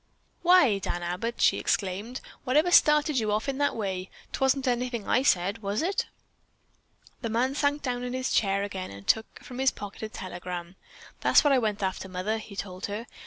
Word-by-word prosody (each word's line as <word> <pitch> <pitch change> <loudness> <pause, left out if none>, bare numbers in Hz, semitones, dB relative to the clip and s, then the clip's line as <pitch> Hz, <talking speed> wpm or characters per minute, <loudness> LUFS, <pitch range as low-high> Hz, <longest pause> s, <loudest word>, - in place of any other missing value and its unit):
"Why, 335 - +5
Dan 175 -2 -3
Abbott," 180 +7 -3
she - - +4
exclaimed, 205 +6 -2 0.2
"whatever 300 +7 +3
started 300 -4 +5
you 215 -2 0
off 215 +4 0
in 275 0 -2
that 285 - +1
way? 190 -3 -3 0.2
'Twasn't 270 0 +1
anything 245 -3 -1
I - - +3
said, 195 -4 +2
was 205 +4 -2
it?" 385 +3 0 1.1
The 230 - -2
man 245 +4 +1
sank 290 0 0
down 245 -2 -2
in 250 0 -4
his 255 0 -2
chair 195 -1 +2
again 190 -2 -5
and 100 0 -11
took 220 0 0
from 250 0 -8
his 265 0 +4
pocket 205 -4 -9
a 220 - -4
telegram. 180 -4 -6 0.4
"That's - - +5
what 290 -2 +4
I 265 - +5
went 210 -3 -1
after, 190 0 -2
mother," 190 +5 -2
he 215 -2 -10
told 185 -2 -5
her. 210 +3 -5
220 Hz, 190 wpm, -27 LUFS, 195-260 Hz, 1.1 s, Why